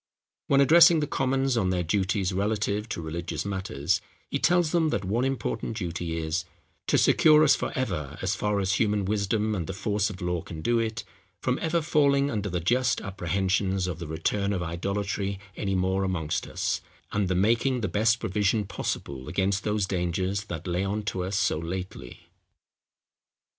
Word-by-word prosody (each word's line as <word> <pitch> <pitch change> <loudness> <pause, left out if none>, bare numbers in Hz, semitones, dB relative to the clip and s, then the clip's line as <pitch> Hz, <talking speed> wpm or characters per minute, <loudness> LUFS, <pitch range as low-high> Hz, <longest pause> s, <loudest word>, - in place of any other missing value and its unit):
When 140 0 +4
addressing 165 +3 +7
the 150 - 0
Commons 135 -1 0
on 100 -6 +1
their 90 -1 0
duties 95 +2 0
relative 105 +2 -1
to 85 - -4
religious 80 0 -4
matters, 95 -2 -1 0.3
he 140 - 0
tells 175 -1 +3
them 165 -2 +2
that 100 -9 -1
one 110 +6 0
important 135 -4 -2
duty 85 -3 -3
is, 80 +2 -1 0.4
"to - - +3
secure 155 -1 +6
us 150 - +6
for - - -2
ever, 85 - -3
as 95 +2 0
far 105 +1 0
as 95 -1 +1
human 105 -2 +1
wisdom 105 +2 0
and 90 -6 -3
the - - -4
force 105 +1 0
of 95 -4 -8
law 90 -1 -1
can 80 -1 -8
do 120 +5 +2
it, 115 0 -2 0.4
from 125 +6 0
ever 165 0 +1
falling 140 -2 +3
under 105 -2 -2
the 90 -1 -1
just 125 +8 +1
apprehensions 95 0 -1
of 90 -2 -4
the 85 - -6
return 100 +6 -1
of 90 -3 -2
idolatry 100 +3 -2 0.2
any 95 -2 -1
more 95 +1 +1
amongst 80 -5 -2
us, - - -2 0.3
and 105 -2 0
the 90 - 0
making 115 +6 +2
the 110 - 0
best 110 +5 +2
provision 105 +1 +1
possible 70 -8 -4
against 95 +4 0
those 105 -1 0
dangers 95 +2 -1
that 85 -4 -6
lay 90 +1 -1
on 105 +2 -2
us 95 +1 -2
so 80 - +1
lately." 90 +3 -6
100 Hz, 175 wpm, -27 LUFS, 90-115 Hz, 0.4 s, addressing